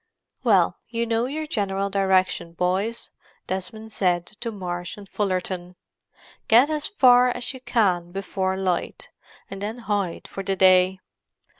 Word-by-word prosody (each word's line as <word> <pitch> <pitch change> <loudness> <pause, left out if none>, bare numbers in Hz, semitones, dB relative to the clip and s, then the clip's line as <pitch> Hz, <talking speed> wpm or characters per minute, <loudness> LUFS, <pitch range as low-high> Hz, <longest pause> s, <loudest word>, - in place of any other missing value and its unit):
"Well, - - +3
you 230 0 -2
know 230 +1 0
your 310 +3 -4
general 200 -8 -1
direction, 185 -3 +1
boys," 190 +7 -1 0.3
Desmond 215 +4 -5
said 175 -4 +1
to 230 - -4
Marsh 175 -3 -5
and 205 -1 -11
Fullerton. 185 -3 -2 0.7
"Get 245 +7 +6
as 300 -1 0
far 250 -9 +5
as 245 +2 -1
you 260 - -9
can 185 -9 +1
before 190 0 -2
light, 185 -2 -2 0.4
and 195 0 -7
then 215 +3 -4
hide 205 -6 -2
for 195 - -6
the 195 0 -1
day. 185 0 +5
195 Hz, 140 wpm, -24 LUFS, 185-230 Hz, 0.7 s, Get